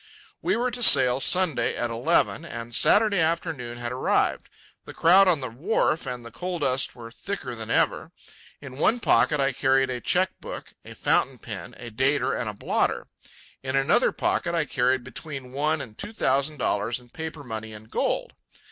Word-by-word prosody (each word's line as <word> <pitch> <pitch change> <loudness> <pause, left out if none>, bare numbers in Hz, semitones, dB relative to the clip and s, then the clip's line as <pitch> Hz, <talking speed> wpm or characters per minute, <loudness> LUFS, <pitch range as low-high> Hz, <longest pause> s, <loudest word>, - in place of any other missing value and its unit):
We - - +1
were 245 +2 0
to 245 +1 -5
sail 130 - +6
Sunday 180 -1 +2
at 120 -1 -2
eleven, 150 +7 +1
and 120 -7 -8
Saturday 210 - +4
afternoon 160 -7 -2
had 120 0 -4
arrived. 125 - 0 0.4
The - - -11
crowd 190 +4 +6
on 165 -6 +2
the 130 - -3
wharf 155 - 0
and 125 -2 -5
the 115 - -10
coal 180 0 -4
dust 135 -4 0
were 115 -1 -10
thicker 135 -2 -6
than 110 -1 -7
ever. - - +1 0.5
In 135 -1 -10
one 230 +9 +2
pocket 150 -8 +3
I 135 0 +2
carried 135 0 +2
a 125 -1 -4
cheque 185 +7 0
book, - - -8
a - - -11
fountain - - +1
pen, - - -8
a 120 -1 -9
dater, 130 +6 +1
and 115 - -3
a 105 - -7
blotter; - - -1 0.5
in 130 0 -3
another 135 +2 +3
pocket 170 0 -1
I 165 -2 +1
carried 130 -1 +1
between 135 -4 -8
one 150 +2 0
and 110 -5 -10
two 210 - -7
thousand 140 -5 0
dollars 115 -1 -1
in 120 -1 -20
paper 160 -2 -7
money 110 -3 -6
and 110 0 -11
gold. - - -2
135 Hz, 185 wpm, -25 LUFS, 120-165 Hz, 0.5 s, sail